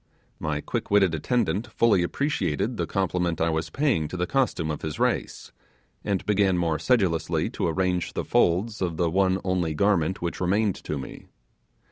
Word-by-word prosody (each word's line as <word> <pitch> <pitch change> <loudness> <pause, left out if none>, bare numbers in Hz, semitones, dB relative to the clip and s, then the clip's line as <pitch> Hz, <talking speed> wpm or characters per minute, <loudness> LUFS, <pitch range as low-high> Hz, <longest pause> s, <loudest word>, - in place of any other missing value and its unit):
My 75 -2 -2
quick - - -4
witted 100 -4 +4
attendant 105 +4 0
fully 110 -4 +3
appreciated 90 - -1
the - - -1
compliment 90 -3 -1
I 85 0 +2
was 80 0 -2
paying 130 - +1
to 90 - -6
the 90 - 0
costume 90 - 0
of 75 - -5
his 80 -1 -4
race, - - -1 0.5
and 100 -3 -1
began 100 -3 +2
more 80 -3 0
sedulously 90 - +1
to - - -1
arrange 90 +1 -1
the - - -3
folds 100 +6 +1
of 85 -3 -1
the 85 -2 +1
one 95 +1 +2
only 90 -4 0
garment 95 -1 +1
which 85 +1 -4
remained 100 +3 +2
to - - -2
me. - - -9
90 Hz, 170 wpm, -25 LUFS, 80-100 Hz, 0.5 s, witted